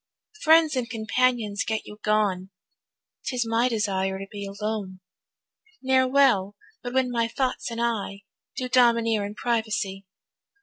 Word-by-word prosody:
Friends 320 -1 +5
and 250 -2 -2
companions 225 -1 0
get 220 -1 -3
you 210 - -11
gone, 205 -3 +1 0.8
'Tis 245 -2 0
my 230 +2 +2
desire 195 -4 -1
to 195 - -6
be 200 -1 -6
alone; 200 -2 -4 0.8
Ne'er 260 0 +3
well 250 -8 +3 0.3
but 245 0 -6
when 260 -1 +2
my 230 -1 +1
thoughts 255 +2 -2
and 230 0 -5
I 215 -4 -2 0.3
Do 255 -2 -2
domineer 230 -4 +3
in 205 +1 -6
privacy. 215 -5 -2
225 Hz, 135 wpm, -25 LUFS, 205-250 Hz, 0.8 s, Friends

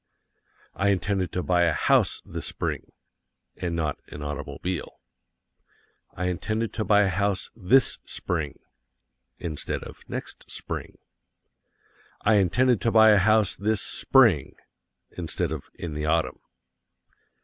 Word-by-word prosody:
I 100 +1 +1
intended 95 -2 0
to 90 - -1
buy 90 -1 +3
a 85 - +2
HOUSE - - +2
this - - -5
Spring - - -4 0.6
(and 85 -2 -3
not 75 -4 -2
an 75 - -8
automobile). 75 +5 -5 1.2
I 90 - -3
intended 110 +5 -2
to 110 - -2
buy 105 0 +4
a - - +2
house 95 +1 -1
THIS 120 +5 +3
Spring 80 -5 -4 0.8
(instead 80 -4 -4
of - - -12
next - - -7
Spring). - - -6 1.2
I 105 0 +4
intended 120 +5 +3
to 115 - +1
buy 110 -1 +7
a 105 - +6
house 110 +1 +3
this 105 0 0
SPRING 115 - +3 0.6
(instead 85 -1 -3
of 80 -4 -6
in 85 -3 -6
the 75 +1 -3
Autumn). 80 +1 0
95 Hz, 125 wpm, -26 LUFS, 85-110 Hz, 1.2 s, buy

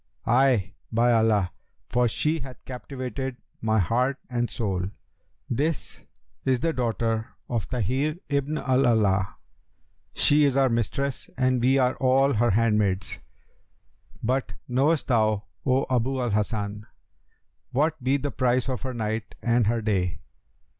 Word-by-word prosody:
'Ay, 120 -5 +3 0.2
by 120 +1 +3
Allah! 110 -5 +3 0.4
for 125 0 +2
she 155 +8 0
hath 130 -4 -10
captivated 130 0 -5 0.2
my 110 0 +2
heart 125 +8 +1
and 120 -1 0
soul.' 95 -6 -2 0.6
'This 150 +6 -2 0.4
is 130 -2 +2
the 165 +1 +1
daughter 115 -3 -1 0.2
of 115 -4 -2
Tahir 130 +6 0
ibn 140 +1 0
al 130 -3 +1
Alaa; 100 -5 +2 0.8
she 150 +1 +5
is 140 -2 +3
our 135 -1 +4
mistress 120 +4 -2
and 130 -1 +2
we 130 +3 +4
are 130 -1 +2
all 135 +2 +3
her 120 +2 +2
handmaids; 105 -3 +1 1.0
but 130 +3 0
knowest 140 +5 +2
thou, 110 -4 +2 0.2
O 130 +1 +3
Abu 130 +1 0
al 120 -3 0
Hasan, 105 0 -2 0.8
what 155 +2 0
be 135 +2 +3
the 140 +1 -3
price 125 +1 +1
of 130 - -2
her 130 -2 -4
night 110 -1 -3
and 120 -2 +3
her 115 0 0
day?' 95 -5 0
125 Hz, 135 wpm, -26 LUFS, 110-135 Hz, 1.0 s, she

